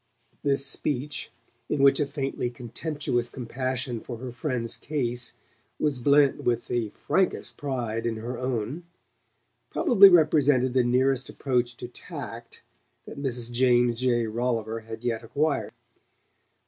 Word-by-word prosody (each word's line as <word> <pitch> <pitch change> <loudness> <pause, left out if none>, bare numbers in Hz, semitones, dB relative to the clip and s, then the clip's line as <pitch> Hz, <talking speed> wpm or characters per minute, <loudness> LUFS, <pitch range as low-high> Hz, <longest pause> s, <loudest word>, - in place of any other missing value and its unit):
This 140 -1 +1
speech, 145 +1 -2 0.4
in 140 -2 +1
which 140 0 +6
a 145 - +1
faintly 135 -3 -2
contemptuous 120 +1 -3
compassion 130 0 -3
for 120 +1 -7
her 125 +1 -6
friend's 120 -2 -2
case 125 -5 -2 0.5
was 145 -4 0
blent 140 +2 +4
with 120 -1 0
the 120 -3 -1
frankest 190 - -1
pride 120 -5 -2
in 115 - -1
her 115 +3 -5
own, 125 +6 -3 0.8
probably 200 -5 +7
represented 145 -7 +4
the 130 -1 +4
nearest 130 +2 +2
approach 125 -3 -1
to - - -6
"tact" 120 - -8 0.4
that 140 - -8
Mrs. 120 -3 -2
James 120 -1 +3
J. 120 -2 +2
Rolliver 115 0 -1
had 110 +1 -9
yet 115 -2 -1
acquired. 140 +6 0
125 Hz, 130 wpm, -26 LUFS, 120-140 Hz, 0.8 s, probably